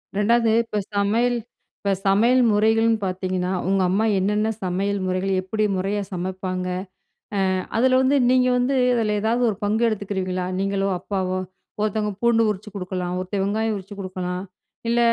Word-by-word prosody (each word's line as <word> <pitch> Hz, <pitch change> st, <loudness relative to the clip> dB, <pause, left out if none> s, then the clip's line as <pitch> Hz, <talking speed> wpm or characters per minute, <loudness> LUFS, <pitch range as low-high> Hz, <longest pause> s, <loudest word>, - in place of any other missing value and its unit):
2ஆவது, 225 Hz, +2 st, +3 dB
இப்போ 215 Hz, -2 st, -4 dB, 0.2 s
சமையல் 230 Hz, +5 st, +2 dB, 0.4 s
இப்ப 200 Hz, -, -1 dB
சமையல் 230 Hz, +6 st, +4 dB
முறைகள்ன்னு 225 Hz, +2 st, +3 dB
பாத்தீங்கன்னா, 185 Hz, 0 st, -2 dB, 0.2 s
உங்க 195 Hz, 0 st, +2 dB
அம்மா 205 Hz, +4 st, +2 dB
என்னென்ன 210 Hz, +3 st, +1 dB
சமையல் 195 Hz, +3 st, -1 dB
முறைகள் 185 Hz, +1 st, 0 dB
எப்படி 215 Hz, +3 st, -2 dB
முறையா 200 Hz, +2 st, -1 dB
சமைப்பாங்க? 185 Hz, 0 st, -3 dB, 0.9 s
அ -, -, -1 dB, 0.2 s
அதில 255 Hz, +2 st, +4 dB
வந்து 265 Hz, +2 st, +3 dB
நீங்க 255 Hz, 0 st, +4 dB
வந்து 255 Hz, +2 st, +1 dB, 0.2 s
அதில 215 Hz, -2 st, +1 dB
ஏதாவது 230 Hz, +3 st, +1 dB
ஒரு 210 Hz, -, -2 dB
பங்கு 215 Hz, +3 st, +1 dB
எடுத்துக்குறுவீங்களா? 190 Hz, -4 st, -2 dB
நீங்களோ, 195 Hz, 0 st, 0 dB
அப்பாவோ. 185 Hz, -1 st, -2 dB, 0.4 s
ஒருத்தவங்க 215 Hz, 0 st, 0 dB
பூண்டு 235 Hz, -1 st, +4 dB
உரிச்சு 210 Hz, +1 st, -4 dB
குடுக்கலாம், 180 Hz, -1 st, -3 dB
ஒருத்தென் 190 Hz, +2 st, -2 dB
வெங்காயம் 215 Hz, +2 st, 0 dB
உரிச்சு 195 Hz, +1 st, -10 dB
குடுக்கலாம், 185 Hz, -1 st, -4 dB, 0.5 s
இல்ல 235 Hz, +1 st, +2 dB
200 Hz, 145 wpm, -23 LUFS, 185-220 Hz, 0.9 s, சமையல்